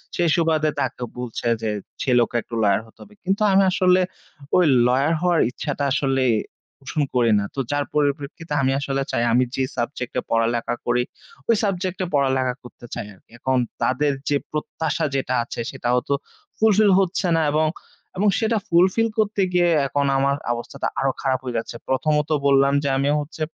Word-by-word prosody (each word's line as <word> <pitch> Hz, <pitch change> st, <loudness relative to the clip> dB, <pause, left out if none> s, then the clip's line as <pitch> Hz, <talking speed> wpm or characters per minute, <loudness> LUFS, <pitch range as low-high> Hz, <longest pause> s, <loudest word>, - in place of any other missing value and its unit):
সেই 175 Hz, -1 st, +2 dB
সুবাদে 160 Hz, -2 st, +2 dB
তাকে 125 Hz, -2 st, -3 dB
বলছে 120 Hz, -1 st, -4 dB
যে 110 Hz, -, -1 dB, 0.3 s
ছেলেওকে 120 Hz, -3 st, +2 dB
একটু 115 Hz, -, -8 dB
lawyer 100 Hz, 0 st, +3 dB
হতে 110 Hz, -, -22 dB
হবে। 210 Hz, -, -18 dB
কিন্তু 195 Hz, +3 st, 0 dB
আমি 195 Hz, +1 st, +5 dB
আসলে 185 Hz, 0 st, +4 dB, 0.5 s
ওই 180 Hz, -, +5 dB, 0.2 s
lawyer 135 Hz, +6 st, +2 dB
হওয়ার 175 Hz, -2 st, +2 dB
ইচ্ছাটা 145 Hz, +2 st, -4 dB
আসলে 135 Hz, -1 st, +1 dB, 0.6 s
পোষণ 140 Hz, +2 st, -3 dB
করি 120 Hz, -2 st, +3 dB
না। -, -, -1 dB
তো -, -, -3 dB
যার 145 Hz, 0 st, 0 dB
পরিপ্রেক্ষিতে 145 Hz, +2 st, -1 dB
আমি 135 Hz, 0 st, +2 dB
আসলে 135 Hz, -1 st, -2 dB
চাই 120 Hz, -, 0 dB
আমি 125 Hz, +2 st, +4 dB
যে 135 Hz, -, 0 dB
subject 125 Hz, 0 st, -3 dB
এ -, -, -3 dB
পড়ালেখা 115 Hz, +1 st, +1 dB
করি 125 Hz, -, +2 dB, 0.5 s
ওই 230 Hz, -, +6 dB
subject 185 Hz, -2 st, -1 dB
এ -, -, -1 dB
পড়ালেখা 130 Hz, -2 st, +2 dB
করতে 120 Hz, 0 st, -13 dB
চাই 120 Hz, -, -4 dB
আরকি। 95 Hz, -, -25 dB
এখন 130 Hz, +1 st, +1 dB, 0.2 s
তাদের 145 Hz, +3 st, +2 dB, 0.2 s
যে 145 Hz, -, +3 dB
প্রত্যাশা 155 Hz, +1 st, -2 dB
যেটা 130 Hz, -1 st, -1 dB
আছে -, -, -8 dB
সেটাও 125 Hz, -2 st, 0 dB
তো 140 Hz, -, +3 dB, 0.4 s
fulfill 215 Hz, -1 st, +4 dB
হচ্ছে 190 Hz, 0 st, 0 dB
না 165 Hz, -, +2 dB
এবং, 155 Hz, +1 st, +2 dB, 0.5 s
এবং 205 Hz, +3 st, +2 dB
সেটা 225 Hz, 0 st, +1 dB
fulfill 185 Hz, +6 st, +3 dB
করতে 210 Hz, -2 st, +1 dB
গিয়ে 175 Hz, -1 st, +4 dB, 0.2 s
এখন 140 Hz, +1 st, 0 dB
আমার 140 Hz, +1 st, +2 dB, 0.2 s
অবস্থাটা 120 Hz, 0 st, -4 dB
আরো 135 Hz, 0 st, +2 dB
খারাপ 130 Hz, -2 st, +1 dB
হয়ে 125 Hz, -2 st, -5 dB
যাচ্ছে। 115 Hz, +1 st, -4 dB
প্রথমত, 150 Hz, +3 st, +1 dB, 0.2 s
বললাম 140 Hz, 0 st, +4 dB
যে 140 Hz, -, 0 dB
আমি 140 Hz, +1 st, +1 dB
হচ্ছে 150 Hz, +2 st, -7 dB
140 Hz, 175 wpm, -22 LUFS, 125-170 Hz, 0.6 s, ওই